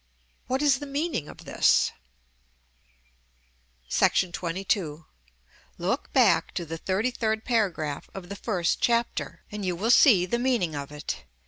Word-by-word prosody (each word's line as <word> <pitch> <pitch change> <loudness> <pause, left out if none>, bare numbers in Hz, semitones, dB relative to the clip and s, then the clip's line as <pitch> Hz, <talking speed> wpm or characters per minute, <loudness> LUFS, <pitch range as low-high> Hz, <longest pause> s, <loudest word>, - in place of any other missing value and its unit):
What 260 +3 0
is 275 -4 +4
the 290 - -7
meaning 280 - -2
of - - -12
this? - - +3 2.0
§ - - -17 0.4
XXII. 170 -3 -2 0.7
Look - - -2
back - - +3
to 170 - -2
the 165 +1 -6
XXXIIIrd 220 +3 -1
paragraph 180 - -1
of 190 -2 -7
the 200 - -5
first 185 -4 -1
chapter, 235 0 0
and 210 -1 -5
you 180 -2 -1
will 215 +7 +1
see 220 - +6
the 235 +6 -1
meaning 240 -10 +1
of 140 -1 -5
it. 150 0 -6
200 Hz, 135 wpm, -26 LUFS, 170-240 Hz, 2.0 s, see